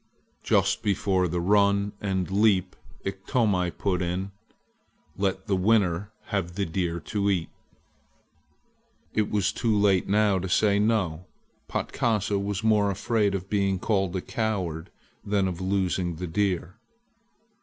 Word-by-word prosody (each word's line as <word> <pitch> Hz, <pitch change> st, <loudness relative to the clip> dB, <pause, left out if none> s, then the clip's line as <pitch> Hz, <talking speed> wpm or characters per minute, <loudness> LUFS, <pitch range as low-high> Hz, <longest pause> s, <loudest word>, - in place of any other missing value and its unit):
Just -, -, +2 dB
before 95 Hz, -2 st, +1 dB
the 90 Hz, +1 st, -2 dB
run 100 Hz, +2 st, +3 dB
and 95 Hz, -2 st, -1 dB
leap 95 Hz, -3 st, +2 dB, 0.3 s
Iktomi 95 Hz, -1 st, 0 dB
put 90 Hz, +1 st, -1 dB
in: 90 Hz, +3 st, -2 dB, 0.8 s
"Let 95 Hz, -1 st, -1 dB
the 100 Hz, -, +1 dB
winner 100 Hz, -1 st, +2 dB, 0.2 s
have 90 Hz, -4 st, -2 dB
the 100 Hz, 0 st, 0 dB
deer 85 Hz, 0 st, -2 dB
to 100 Hz, +5 st, -1 dB
eat!" 90 Hz, -4 st, 0 dB, 1.6 s
It 110 Hz, -1 st, +1 dB
was 100 Hz, -3 st, +1 dB
too 110 Hz, -3 st, 0 dB
late 100 Hz, -3 st, +3 dB
now 105 Hz, -1 st, +3 dB
to 95 Hz, +1 st, -4 dB
say 100 Hz, +2 st, +3 dB
no. 95 Hz, -6 st, 0 dB, 0.4 s
Patkasa 105 Hz, -3 st, 0 dB
was 100 Hz, 0 st, -3 dB
more 105 Hz, -2 st, +3 dB
afraid 105 Hz, 0 st, 0 dB
of 95 Hz, -1 st, -4 dB
being 100 Hz, -2 st, +1 dB
called 95 Hz, -2 st, 0 dB
a 95 Hz, -, -1 dB
coward 95 Hz, -10 st, -3 dB, 0.3 s
than 100 Hz, -2 st, +1 dB
of 90 Hz, -1 st, -4 dB
losing 95 Hz, -2 st, 0 dB
the 90 Hz, +3 st, -5 dB
deer. 95 Hz, +2 st, -1 dB
95 Hz, 135 wpm, -26 LUFS, 90-105 Hz, 1.6 s, run